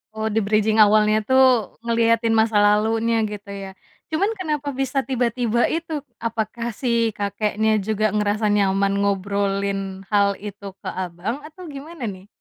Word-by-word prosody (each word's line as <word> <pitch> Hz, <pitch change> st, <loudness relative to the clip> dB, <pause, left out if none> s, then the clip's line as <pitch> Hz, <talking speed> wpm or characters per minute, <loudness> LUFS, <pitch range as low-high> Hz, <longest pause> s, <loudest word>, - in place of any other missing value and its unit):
Oh, 220 Hz, 0 st, -2 dB
di-bridging 215 Hz, +1 st, +2 dB
awalnya 215 Hz, 0 st, +5 dB
tuh, 260 Hz, -4 st, +4 dB
ngeliatin 230 Hz, 0 st, +2 dB
masa 220 Hz, -1 st, +2 dB
lalunya 220 Hz, +2 st, +2 dB
gitu 205 Hz, -1 st, -8 dB
ya? 195 Hz, -1 st, -6 dB, 0.4 s
Cuman 385 Hz, +7 st, 0 dB
kenapa 300 Hz, -5 st, -2 dB
bisa 270 Hz, 0 st, -1 dB
tiba-tiba 240 Hz, -2 st, 0 dB
itu? 325 Hz, -2 st, -3 dB, 0.3 s
Apakah 230 Hz, +1 st, -3 dB
si 230 Hz, -1 st, 0 dB
kakeknya 210 Hz, +2 st, 0 dB
juga 215 Hz, +1 st, 0 dB
ngerasa 210 Hz, +1 st, +1 dB
nyaman 200 Hz, -1 st, +2 dB
ngobrolin 200 Hz, 0 st, 0 dB, 0.3 s
hal 200 Hz, -1 st, +4 dB
itu 205 Hz, 0 st, -9 dB, 0.2 s
ke -, -, -8 dB
Abang, 185 Hz, +9 st, -4 dB
atau 315 Hz, +4 st, -11 dB
gimana 295 Hz, +1 st, -9 dB
nih? 190 Hz, -1 st, -8 dB
220 Hz, 135 wpm, -22 LUFS, 205-245 Hz, 0.4 s, awalnya